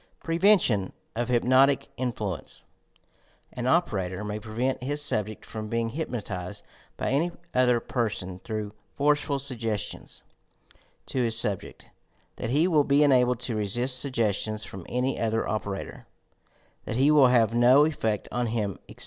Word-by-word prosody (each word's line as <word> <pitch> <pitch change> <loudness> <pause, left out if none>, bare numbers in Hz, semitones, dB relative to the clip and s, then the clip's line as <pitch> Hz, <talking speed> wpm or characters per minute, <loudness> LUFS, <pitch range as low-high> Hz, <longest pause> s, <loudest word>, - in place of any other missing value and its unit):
PREVENTION 165 - +3 0.2
OP 120 +1 -1
HYPNOTIC 130 +3 +3
INFLUENCE 110 -8 -4 0.9
An 125 0 -3
operator 100 - 0
may 105 0 -4
prevent 115 +5 -2
his 145 +3 -2
subject 110 -7 -1
from 110 -1 -6
being 115 +1 -1
hyp 160 +5 -3
notized 100 -4 -5 0.3
by - - -2
any 160 +6 +1 0.2
other 125 -1 +3
person 100 -7 -3
through 105 0 -5 0.2
forceful 145 0 +1
suggestions 115 -6 -4 0.8
to 130 - -2
his 115 -2 +3
subject 105 -5 -2 0.5
that 115 - -4
he 150 +7 +3
will 155 -5 +4
be 140 +1 +3
enabled 125 -4 +3
to 125 -2 -1
resist 120 +5 +1
sugges 115 -7 +1
tions 110 0 -3
from 95 -4 -9
any 125 +2 -1
other 115 0 0
operator 100 -2 -5 0.4
— - - -35
that - - -4
he 135 +5 +4
will 145 -4 +7
have 115 -3 +3
no 125 +5 +6
effect 110 -9 -1
on 120 0 -1
him, 105 -4 -2
etc. - - -13
120 Hz, 150 wpm, -26 LUFS, 110-135 Hz, 0.9 s, will